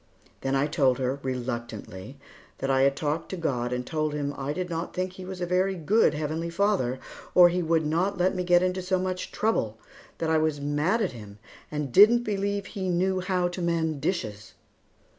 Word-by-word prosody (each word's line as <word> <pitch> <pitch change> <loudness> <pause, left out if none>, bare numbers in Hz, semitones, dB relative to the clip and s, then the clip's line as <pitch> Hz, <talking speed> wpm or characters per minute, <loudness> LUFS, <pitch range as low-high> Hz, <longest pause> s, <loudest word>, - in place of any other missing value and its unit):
Then 135 0 0
I 135 +1 +2
told 135 -4 +2
her, 130 +1 -1
reluctantly, 120 -3 -5 0.4
that 135 0 -1
I 135 0 +3
had 140 0 +4
talked 150 +2 -2
to 190 - -4
God 125 -7 -1
and 125 0 -2
told 155 -1 -1
Him 145 -1 -2
I 140 +1 -3
did 180 +4 -3
not 165 0 -4
think 185 0 -1
that - - -18
He 185 - -7
was 185 -1 -7
a - - +1
very 185 +2 +1
good 185 +1 +3
Heavenly 155 +2 -2
Father, 170 -9 +1 0.4
or 180 -1 +9
He 180 +1 0
would 160 -1 +1
not 175 +6 0
let 180 +1 +2
me 185 -1 -2
get 175 0 +4
into 185 0 0
so 185 +1 0
much 185 0 -3
trouble; 115 - 0 0.4
that 160 -1 -1
I 160 - +4
was 155 -2 0
mad 150 +10 +1
at 190 - -1
Him, 105 -4 -11 0.3
and 150 -3 -3
didn't 225 - +7
believe 200 -2 -1
He 190 -2 -4
knew 185 +2 +1
how 180 -1 0
to 180 +1 -6
mend 160 -4 0
dishes. 110 - -3
165 Hz, 205 wpm, -27 LUFS, 135-185 Hz, 0.4 s, or